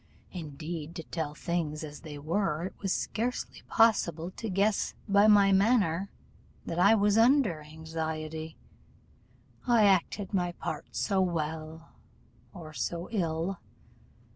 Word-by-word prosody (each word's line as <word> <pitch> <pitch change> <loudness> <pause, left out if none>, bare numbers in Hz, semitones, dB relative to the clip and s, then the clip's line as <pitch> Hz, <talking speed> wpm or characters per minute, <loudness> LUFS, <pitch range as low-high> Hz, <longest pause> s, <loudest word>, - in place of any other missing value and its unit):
Indeed, 160 0 -6
to 165 - -5
tell 155 -2 -4
things 165 -3 -2
as 150 -1 -8
they 150 -3 -9
were, 160 +1 -1
it 190 - -6
was 195 -2 -1
scarcely 240 +6 -2
possible 180 -7 +3
to 225 +3 -6
guess 200 +2 +1
by 200 +1 +5
my 200 -2 +6
manner 195 -3 +3 0.6
that 165 - -3
I 200 +5 +6
was 205 0 +3
under 235 - +4
any 150 0 -13
anxiety, 160 0 -5 1.1
I 235 -3 +5
acted 195 +1 +1
my 175 -2 0
part 155 -2 -5
so 195 -2 +1
well, 160 -2 -3 0.6
or 160 -5 -10
so 170 +6 -3
ill. 175 -2 -1
175 Hz, 130 wpm, -29 LUFS, 160-200 Hz, 1.1 s, my